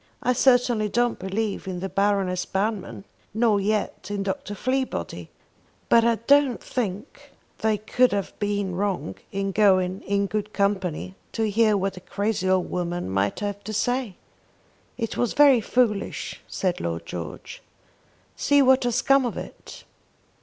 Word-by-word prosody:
I 250 - +3
certainly 245 -4 +3
don't 240 +2 +1
believe 195 +2 -3
in 180 -1 -4
the 190 - -3
Baroness 195 -1 +1
Banmann, 190 - -3 0.3
nor 220 -2 +3
yet 205 -1 -2
in 205 -1 -2
Dr. 195 +1 -4
Fleabody; 260 +4 -2 0.6
but 230 -1 +6
I 235 0 +3
don't 275 +3 +3
think 210 0 -5 0.3
they 220 -1 +1
could 245 +4 +2
have 200 -1 -2
been 205 -2 -1
wrong 190 - -2 0.2
in 195 0 -2
going 190 -2 +3
in 200 0 0
good 210 +2 -3
company 185 - -1 0.2
to 220 -1 0
hear 215 0 +3
what 195 0 -2
a - - -8
crazy 195 +1 -1
old 185 -1 +1
woman 175 - -2
might 100 - 0
have 205 0 -4
to 215 - -6
say." 245 -1 -1 0.8
"It 230 -3 -3
was 245 - 0
very 280 -5 +6
foolish," 215 -3 -1
said 185 -2 -2
Lord 85 0 -3
George. 85 -3 -7 0.7
"See 285 -1 +3
what 260 -1 +4
has 245 +2 +1
come 275 -1 +4
of 240 - -3
it!" - - -9
205 Hz, 150 wpm, -24 LUFS, 190-230 Hz, 0.8 s, but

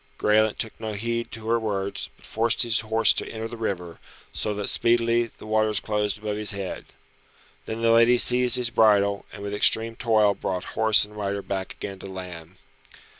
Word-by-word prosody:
Graelent 110 0 +2
took 110 - -2
no 110 -1 -5
heed 115 +3 -3
to 110 0 -8
her 115 +1 +2
words, 100 -3 -3
but - - -19
forced 115 +1 +1
his 115 -2 +1
horse 110 0 +3
to - - -3
enter 110 0 -5
the 120 - -8
river, 90 -7 -5 0.3
so 105 - -2
that 105 -1 -3
speedily 115 0 +1
the - - -13
waters 110 -1 +1
closed 105 -1 -2
above 105 -1 -4
his 105 0 +1
head. 100 -2 -6 0.8
Then 115 +1 -5
the 115 - +4
lady 115 +2 +5
seized 125 +1 +4
his 125 -1 +2
bridle, 100 -3 +3
and 100 0 -10
with 100 0 -5
extreme 110 +2 +3
toil 110 -4 +2
brought 90 -2 -4
horse 110 -2 +4
and 105 0 -16
rider 100 -1 -3
back 95 -1 -5
again 100 -1 -8
to 95 - -9
land. 90 -2 -9
110 Hz, 190 wpm, -24 LUFS, 100-115 Hz, 0.8 s, lady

